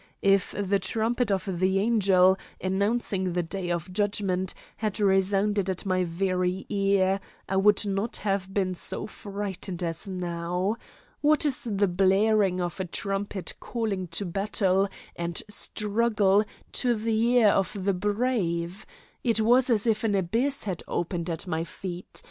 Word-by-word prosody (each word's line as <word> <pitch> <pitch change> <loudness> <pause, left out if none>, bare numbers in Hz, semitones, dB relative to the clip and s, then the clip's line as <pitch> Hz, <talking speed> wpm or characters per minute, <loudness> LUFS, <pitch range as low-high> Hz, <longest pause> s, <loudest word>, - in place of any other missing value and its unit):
If 195 -1 +3
the 200 -1 +1
trumpet 225 +4 0
of 190 -2 -1
the 190 +1 +2
angel, 195 -3 +4 0.2
announcing 190 -1 0
the 175 0 0
day 180 +2 -4
of 175 +1 -3
judgment, 195 -2 0 0.2
had 215 -2 -2
resounded 195 0 +2
at 185 +1 -3
my 185 -1 +1
very 185 +1 -1
ear, 195 -1 +2 0.3
I 190 - 0
would 210 +2 +4
not 200 +3 -1
have 195 -2 -2
been 190 -2 0
so 180 - -2
frightened 195 -4 -5
as 165 +2 -2
now. 180 +2 -2 0.4
What 305 +1 +3
is 265 -4 +1
the 200 -1 +2
blaring 195 +1 +3
of 175 +1 -3
a 190 - -1
trumpet 195 +2 -3
calling 210 -6 -3
to 200 - -3
battle 195 +1 +1 0.3
and 170 -1 -2
struggle 210 -1 +2 0.3
to 245 -2 +1
the 220 0 0
ear 230 -4 +6
of 195 +1 +1
the 200 - +3
brave? 200 -3 -1 0.4
It 230 -3 +2
was 245 +4 +4
as 225 -2 +2
if 220 -1 +1
an 215 -3 +1
abyss 230 +10 0
had 190 -5 -3
opened 175 0 -2
at 165 +2 -3
my 165 -2 -2
feet. 180 +1 -5
195 Hz, 150 wpm, -27 LUFS, 185-210 Hz, 0.4 s, ear